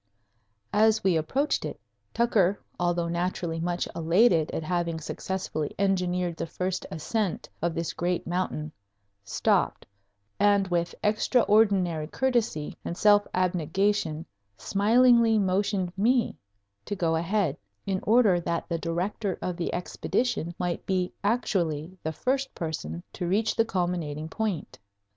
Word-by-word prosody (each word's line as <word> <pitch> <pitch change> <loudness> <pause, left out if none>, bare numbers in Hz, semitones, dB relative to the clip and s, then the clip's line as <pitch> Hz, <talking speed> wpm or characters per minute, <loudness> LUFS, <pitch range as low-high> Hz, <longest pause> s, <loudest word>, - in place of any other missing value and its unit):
As 220 +1 +4
we 190 -3 +3
approached 265 - 0
it, - - -5 0.3
Tucker, 205 -5 +2 0.2
although 175 -1 +1
naturally 170 -1 -2
much 175 +1 -1
elated 170 0 +3
at 160 - -3
having 170 -1 -1
successfully 160 -2 -4
engineered 180 -3 0
the - - -3
first 185 +2 -3
ascent 200 +4 -2
of 170 0 0
this 165 -1 -2
great 175 0 -1
mountain, 170 -3 -2 0.5
stopped 100 - +1 0.5
and 200 -1 +4
with 170 -1 0
extraordinary 205 - +3
courtesy 235 - -1
and 170 - -4
self 205 -1 +5
abnegation 180 -1 0 0.3
smilingly 230 +2 +4
motioned 190 -2 0
me 235 +4 +2 0.5
to 205 - -3
go 165 -3 +1
ahead 170 -2 0 0.3
in 190 -1 0
order 215 -5 +4
that 170 0 -2
the 170 -1 -1
director 180 +4 -2
of 180 - -3
the 170 -1 -2
Expedition 175 0 -2
might 175 -1 -2
be 185 -2 0
actually 185 -7 0
the 160 - -2
first 265 - -1
person 85 - -4
to 175 - -3
reach 210 +5 +1
the 225 - +3
culminating 175 -6 -2
point. 205 -5 -3
180 Hz, 125 wpm, -27 LUFS, 170-205 Hz, 0.5 s, self